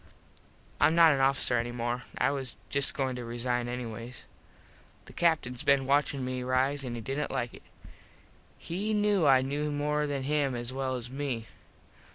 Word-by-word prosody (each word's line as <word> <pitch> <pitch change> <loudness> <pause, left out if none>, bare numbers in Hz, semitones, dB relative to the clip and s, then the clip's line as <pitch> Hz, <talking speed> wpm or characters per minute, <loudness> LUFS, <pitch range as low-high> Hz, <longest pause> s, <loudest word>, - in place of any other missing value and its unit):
Im 160 - +5
not 165 -1 +7
an 140 - +1
officer 135 -2 +3
any 120 +1 -3
more. 120 +1 -3
I - - +2
was 135 -3 -4 0.2
just 140 0 +2
goin 130 -2 -1
to - - -5
resine 120 +1 -1
anyways. 120 0 -6 0.8
The - - -13
Captins 150 -8 +1
been 140 -1 +3
watchin 140 -1 +1
me 130 0 -3
rise 130 +3 +1
an 120 -2 -4
he 115 - -5
didnt 135 +6 -3
like 120 -1 -2
it. - - -12 1.0
He 205 +6 -2
knew 205 -6 +3
I 130 -1 +6
knew 145 +3 -2
more 150 +1 0
than 140 -2 -2
him 140 -2 0
as 120 +1 -4
well 130 -1 -2
as 125 0 -6
me. 130 -5 -3
135 Hz, 175 wpm, -29 LUFS, 125-145 Hz, 1.0 s, not